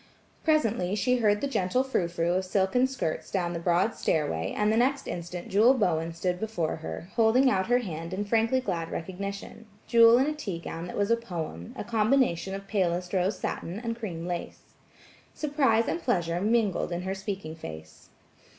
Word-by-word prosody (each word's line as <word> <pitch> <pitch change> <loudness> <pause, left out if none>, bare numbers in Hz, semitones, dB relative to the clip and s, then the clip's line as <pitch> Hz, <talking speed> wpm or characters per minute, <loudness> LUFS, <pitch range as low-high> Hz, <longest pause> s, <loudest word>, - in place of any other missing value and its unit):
Presently 230 - +2
she 250 +4 +2
heard 210 -3 +2
the 280 - 0
gentle 250 0 +1
frou 260 -10 0
frou 170 0 0
of 185 +1 +1
silken 195 +7 +2
skirts 250 -12 -3
down 175 -3 -1
the 170 - -3
broad 175 +5 +2
stairway 80 - -1
and 210 +1 +2
the - - +2
next 270 +4 +1
instant 175 +2 -5
Jewel 220 +6 +5
Bowen 170 -8 +1
stood 180 +2 -2
before 200 -7 -2
her, 80 - -7
holding 240 +4 +5
out 190 -2 +1
her 245 +1 +4
hand 170 -7 -5
in 200 +2 -2
frankly 225 +4 +2
glad 170 -8 -3
recognition–Jewel 205 +5 +1
in 260 - +3
a 305 - 0
tea 220 - -4
gown 165 0 -6
that - - -6
was 205 +2 +1
a - - +6
poem, 165 - -6
a - - -3
combination 220 -5 +1
of 195 0 -8
palest 180 -3 0
rose 190 +2 +1
satin 175 +5 -4
and 230 -1 -3
cream 180 -8 -5
lace. 175 -1 -6 0.6
Surprise 275 -7 +2
and 340 - -1
pleasure 175 - 0
mingled 215 -4 +1
in 175 +1 -3
her 190 +1 -2
speaking 195 -4 -5
face. 80 - -10
195 Hz, 180 wpm, -28 LUFS, 175-230 Hz, 0.6 s, a